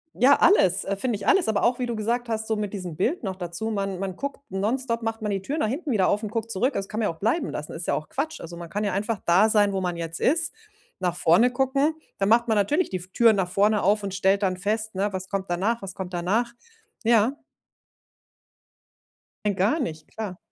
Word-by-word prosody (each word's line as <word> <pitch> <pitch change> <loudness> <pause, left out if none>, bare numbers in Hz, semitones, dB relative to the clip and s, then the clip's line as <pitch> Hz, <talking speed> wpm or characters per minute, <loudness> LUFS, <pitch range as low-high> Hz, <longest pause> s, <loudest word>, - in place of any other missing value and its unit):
Ja, 270 +4 +6
alles, 190 - +4
äh, 200 - -1
finde 230 +2 -1
ich 200 +1 -6
alles, 390 - +4
aber 215 -2 +1
auch, 245 +1 +2
wie 250 - -1
du 235 - -3
gesagt 235 +3 -1
hast, 220 -1 -2
so 220 - 0
mit 210 -2 -3
diesem 180 -6 -6
Bild 245 - -1
noch 190 -2 -3
dazu. 180 +5 -4
Man 195 -2 -2
man 190 -1 -4
guckt 280 +2 -5
nonstop 230 +4 -1
macht 225 0 -3
man 210 - -1
die 195 -1 -1
Tür 285 +10 -3
nach 220 - +1
hinten 285 +6 -3
wieder 195 -5 +3
auf 210 - +1
und 215 - -4
guckt 230 0 -3
zurück. 250 +8 +1
Das 195 - -3
kann 215 - -4
man 215 - +1
ja 165 - -5
auch - - -25
bleiben 275 - 0
lassen, 150 - -5
ist 165 +1 -1
ja - - +2
auch 155 - -5
Quatsch. 310 +4 -3
Also, 170 +1 -8
man 170 -1 -8
kann 205 +3 -2
ja 200 -3 -1
einfach 210 +1 -1
da 190 +6 +5
sein, 205 -2 +4
wo 190 - -1
man 175 -2 -2
jetzt 165 0 -4
ist, 320 +3 +2 0.5
nach 180 -2 -1
vorne 180 +10 +4
gucken. 275 +4 +1 0.2
Da 195 - +1
macht 235 +2 +4
man 220 - +2
natürlich 295 - +1
die 185 - -2
v 180 - -9
Tür 230 +1 +5
nach 190 -3 0
vorne 205 +2 +2
auf 205 +2 +2
und 195 -1 -4
stellt 195 +1 +2
dann 185 -1 +1
fest, 215 +2 -1
ne? 200 +2 -1
„Was 185 0 -4
kommt 195 -2 -3
danach, 200 +7 0
was 190 -1 -6
kommt 185 -1 -6
danach?“ 215 +8 0 0.5
Ja. 230 +2 +4 2.1
Nein, 200 -2 +1
gar 210 - +2
nicht, 160 - -4
klar. 205 -5 -6
210 Hz, 245 wpm, -25 LUFS, 190-235 Hz, 2.1 s, Ja